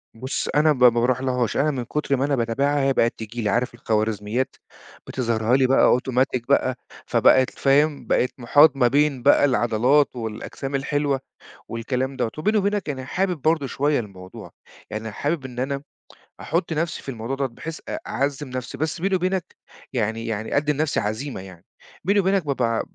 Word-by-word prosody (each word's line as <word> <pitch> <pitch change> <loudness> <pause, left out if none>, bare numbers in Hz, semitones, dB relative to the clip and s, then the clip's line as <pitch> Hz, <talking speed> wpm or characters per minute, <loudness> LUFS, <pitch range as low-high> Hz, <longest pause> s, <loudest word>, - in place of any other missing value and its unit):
بُص، 130 +4 -3
أنا 155 +1 +5
ب 125 -3 -1
ما 125 - +10
باروحلهاش، 125 0 0
أنا 150 +2 +2
من 125 -3 -3
كتر 145 +1 -1
ما 135 - +1
أنا 145 -1 +1
باتابعها 135 +5 0
هي 135 0 +2
بقت 115 -1 +2
تيجي 115 +2 -6
لي، 105 - 0
عارف 120 +4 0
الخوارزميات 110 +2 -1 0.5
بتظهِرها 115 -1 0
لي 130 -1 +3
بقى 130 -1 +5
automatic 130 0 0
بقى، 130 -2 +3 0.3
فبقت 130 -1 +4
فاهم، 145 +2 +1
بقيت 125 - +2
محاط 145 +5 +5
ما 125 -3 +3
بين 140 -1 +1
بقى 145 0 +5
العضلات 125 +3 +2
والأجسام 115 +4 -5
الحلوة 140 0 0 0.5
والكلام 125 +3 -3
دوّة. 120 -3 -1
وبيني 210 +7 +1
وبينك 205 -3 0
يعني 130 -3 -4
حابب 180 +1 -1
برضه 155 -1 +1
شوية 145 +1 +1
الموضوع، 95 -4 -9 0.4
يعني 110 +1 -5
حابب 145 +6 -2
إن 125 -1 -7
أنا 140 +2 -2 0.6
أحط 165 +1 -1
نفسي 165 +2 -2
في - - -9
الموضوع 120 +2 -4
دوّة 135 0 -1
بحيث 160 +7 -8
أ 310 - -3
أعزّم 140 0 -2
نفسي، 125 -1 -5
بس 160 +2 -2
بيني 195 +1 +1
وبينك 185 0 -2 0.4
يعني 115 -1 -1
يعني 110 +2 -2
أدي 150 +1 +2
لنفسي 150 +1 0
عزيمة 110 +2 -3
يعني، 90 -3 -13 0.4
بيني 200 +4 +3
وبينك 190 -2 +1
بابقى 135 -4 0
ع 115 - 0
130 Hz, 175 wpm, -23 LUFS, 120-145 Hz, 0.6 s, ما